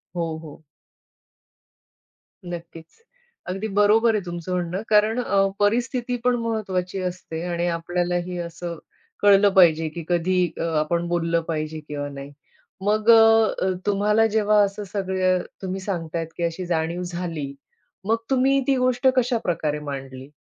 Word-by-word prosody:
हो, 165 -2 -2
हो. 155 +1 -12 1.8
नक्कीच, 170 - -9 0.5
अगदी 195 +4 -3
बरोबर 220 +2 +4
आहे 200 - -1
तुमचं 175 +1 -6
म्हणणं 180 +2 -2
कारण 215 +3 +3
अ, 195 0 +2
परिस्थिती 245 +3 0
पण 250 0 +3
महत्त्वाची 195 -5 -2
असते 175 -3 -5
आणि 175 0 -1
आपल्यालाही 175 +1 -2
असं 170 0 -5 0.4
कळलं 200 0 +6
पाहिजे, 165 -4 +5
की 170 +1 -7
कधी 180 +1 +2
अ, - - -2 0.2
आपण 170 +3 -1
बोललं 170 -1 0
पाहिजे 155 -1 -3
किंवा 145 -1 -4
नाही. 140 0 -9 0.5
मग 215 +2 +1
अ, 225 -4 +5
तुम्हाला 210 +2 +3
जेव्हा 210 -1 +3
असं 200 +1 -3
सगळं 185 -2 +1 0.2
तुम्ही 190 0 -3
सांगतायत 165 -4 -3
की 170 - -2
अशी 170 +2 -2
जाणीव 170 +1 -1
झाली. 170 -5 -4 0.5
मग 225 +2 +2
तुम्ही 270 +1 +3
ती 275 - +3
गोष्ट 255 +1 +2
कशा 245 -1 +2
प्रकारे 155 -4 -1
मांडली? 135 -2 -7
180 Hz, 135 wpm, -23 LUFS, 165-210 Hz, 1.8 s, कळलं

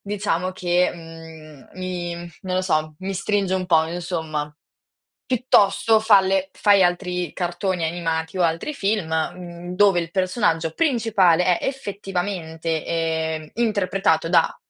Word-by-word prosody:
diciamo 195 -3 -2
che, 180 -1 +1
mhmm, 160 -4 -12
mi 180 -2 -4 0.3
non 185 -1 -2
lo 185 - +2
so, 155 -4 0
mi 195 +1 -4
stringe 195 0 0
un 185 -1 -1
po', 160 -3 +4
insomma. 160 -3 -4 0.8
Piuttosto 225 -3 +3
falle 195 -3 +3
fai 200 -2 +4
altri 180 -2 -1
cartoni 175 0 -2
animati 160 0 -2
o 180 - +2
altri 165 - -1
film, 205 -6 -1
mhmm, 175 +2 -4
dove 195 -2 +4
il 165 0 -5
personaggio 180 -4 0
principale 195 - +3
è, - - -4
effettivamente, 180 - -3
ehm, 160 -1 -2
interpretato 195 -7 +1
da - - +3
180 Hz, 125 wpm, -22 LUFS, 165-195 Hz, 0.8 s, po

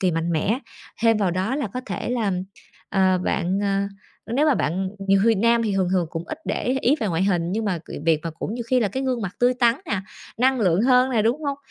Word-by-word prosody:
kỳ 185 -2 +2
mạnh 165 +1 -1
mẽ. 195 +10 +1 0.4
Thêm 225 -1 +5
vào 195 -4 +1
đó 190 +9 -1
là 285 - -1
có 255 - -2
thể 185 +2 -4
là, 225 -5 0 0.6
ờ, 185 -1 +3
bạn, 185 +3 0
ờ, 195 -1 +1 0.6
nếu 295 +3 +3
mà 290 - +4
bạn 185 +3 -1 0.2
nhiều 195 0 +5
khi 230 -1 +5
nam 230 +3 +3
thì 210 -3 0
thường 190 -2 +1
thường 180 -3 +2
cũng 165 0 -5
ít 310 - -6
để - - -2
ý 260 +2 +1
ý 275 +6 +3
về 215 - 0
ngoại 170 0 0
hình, 175 -3 +1
nhưng 220 +1 -1
mà 185 -5 -1
c - - -16 0.2
việc 160 -2 +3
mà 165 - -3
cũng 180 +7 -5
nhiều 240 -1 -4
khi 255 -1 +3
là 210 - +1
cái 265 +7 -3
gương 255 -3 -1
mặt 195 -1 -5
tươi 250 +1 +4
tắn 240 -2 +3
nè, 200 -7 -1 0.4
năng 260 0 +3
lượng 185 0 +3
hơn 255 +1 +4
nè, 225 -4 +2
đúng 245 +8 0
hông? 280 -1 -2
210 Hz, 260 wpm, -23 LUFS, 185-250 Hz, 0.6 s, Thêm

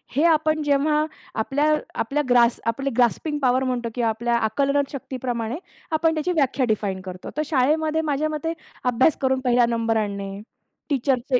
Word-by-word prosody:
हे 290 - +3
आपण 310 -1 +3
जेव्हा 300 +2 +2 0.3
आपल्या 275 +6 0 0.4
आपल्या 280 +6 0
ग्रास 240 -1 +4
आपले 275 +4 0
ग्रास्पिंग 255 +5 +1
पॉवर 255 0 +3
म्हणतो 245 -2 -1
किंवा 235 -2 +1
आपल्या 235 +2 0
आकलन 275 +6 +1
शक्तीप्रमाणे 250 -3 -4 0.3
आपण 320 +1 +2
त्याची 315 +4 -1
व्याख्या 275 -5 +1
डिफाईन 200 -3 -1
करतो. 185 -1 -7
तर 305 - +1
शाळेमध्ये 310 +3 +1
माझ्या 305 0 0
मते 310 +2 -2 0.3
अभ्यास 250 +5 +3
करून 265 -1 +2
पहिला 245 -1 +3
नंबर 230 -1 0
आणणे, 200 -1 -3 0.5
टीचरचे 260 -2 +1
260 Hz, 155 wpm, -23 LUFS, 235-300 Hz, 0.5 s, ग्रास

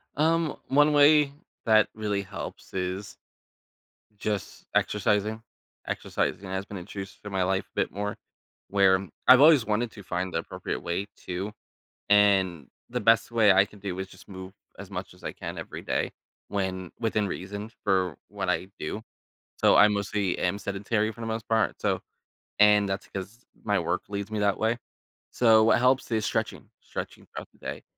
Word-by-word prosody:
Um, 160 +1 +2
one 145 +2 +4
way 145 0 +6 0.3
that 110 -2 +5
really 105 -2 -1
helps 95 0 -8
is 95 +2 -4 1.0
just 105 -2 -4
exercising. 105 +2 +1 0.4
Exercising 95 - -2
has 95 +1 -3
been 100 -1 -7
introduced 95 +1 -8
to 105 - -7
my 95 -1 0
life 95 +1 +1
a - - -38
bit - - -1
more 105 +1 -3 0.5
where 95 -1 +4 0.2
I've 130 +1 +10
always 150 -5 +7
wanted 110 +2 0
to 100 - -11
find 90 0 -3
the - - 0
appropriate 80 - -5
way 90 +4 -2 0.2
to, 95 +3 -3 0.6
and 95 -6 +4 0.2
the 125 +1 -2
best 115 +2 +4
way 110 -3 +5
I 95 +1 +6
can 105 0 -16
do 95 -2 -4
is 95 - -3
just 95 - -17
move 95 0 -9 0.3
as 100 - -9
much 95 0 -6
as 90 - -20
I - - -3
can - - -7
every - - -7
day - - -1 0.4
when 95 -3 -3
within 110 -3 0
reason 100 +3 -5
for 95 -5 +1
what - - -3
I 95 - 0
do. 90 +8 -4 0.6
So, - - +5
I 105 - +8
mostly 100 -2 -1
am 90 +2 0
sedentary 105 +2 -1
for 115 +2 -12
the 115 - -4
most 110 0 -3
part 110 -2 +1
so - - +1 0.6
and 105 -1 +6
that's 95 +1 -3
because 100 +5 -8 0.2
my - - +2
work - - -1
leaves 100 0 -4
me 110 - -2
that 100 -1 +2
way. 110 +2 +1 0.5
So 110 -2 +5
what - - +5
helps 130 +1 +3
is 110 -2 +1
stretching; 110 +1 -2
stretching - - -7
throughout - - -9
the - - -26
day. - - -6
100 Hz, 175 wpm, -27 LUFS, 95-110 Hz, 1.0 s, I've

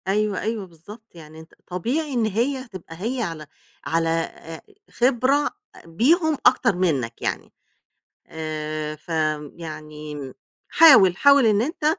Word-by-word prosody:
أيوه، 205 0 0
أيوه 220 -2 -3
بالضبط، 190 +6 -15
يعني 160 -1 -13
أنت 160 +1 -15
طبيعي 260 - -2
إن 235 -3 +1
هي 250 +5 -1
تبقى 185 -6 -11
هي 245 +3 -2
على 165 -7 -5 0.4
على 165 0 0
آآ 165 0 -4 0.3
خبرة 265 +4 +2 0.4
بيهم 305 - +2
أكتر 195 - +4
منك 140 -11 -1
يعني. - - -4 0.7
آآ 155 -1 -5
ف 155 - -23
آمم 155 -2 -1
يعني 150 -4 -8 0.4
حاول، 195 - +7
حاول 280 0 +5
إن 210 -1 +3
أنت 300 +4 -4
180 Hz, 130 wpm, -22 LUFS, 155-240 Hz, 0.7 s, حاول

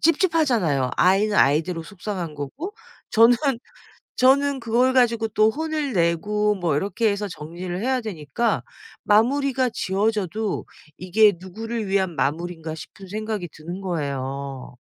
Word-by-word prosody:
찝찝하잖아요. 260 - +2
아이는 200 +3 +3
아이대로 165 +4 +2
속상한 185 -5 -5
거고 280 - -6 0.4
저는 230 +2 +6 0.8
저는 275 +1 +4
그걸 245 +3 +2
가지고 230 -3 +3
또 215 +1 +3
혼을 305 0 -2
내고 205 +5 +1
뭐 175 -6 -1
이렇게 205 +5 +1
해서 200 0 -2
정리를 175 +3 -6
해야 260 0 +1
되니까 210 - -2 0.4
마무리가 260 +4 +3
지어져도 210 0 -1 0.3
이게 205 +3 +4
누구를 220 +4 -5
위한 190 -4 0
마무리인가 160 +3 -2
싶은 190 +4 -11
생각이 215 -3 -4
드는 175 +5 -8
거예요. 140 -6 -4
205 Hz, 305 characters per minute, -23 LUFS, 170-230 Hz, 0.8 s, 저는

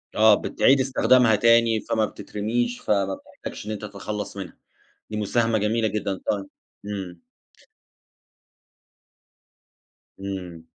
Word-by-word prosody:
آه، 110 -1 +7
بتعِيد 135 +1 +3
استخدامها 125 -3 +4
تاني، 115 0 +4
فما 110 -2 0
بتترمِيش، 115 +4 -3
فما 100 -2 +1
بتحتاجش - - -10
إن 110 - -4
أنت 105 - -5
تتخلّص 105 0 -6
منها. 95 -2 -7 0.5
دي 105 - -4
مساهَمة 115 +2 +1
جميلة 110 +2 +1
جدًا. 105 -2 -2
طي 100 -1 0 0.4
إمم. 95 -4 -6 3.0
إمم. 90 -4 -6
105 Hz, 105 wpm, -24 LUFS, 100-115 Hz, 3.0 s, آه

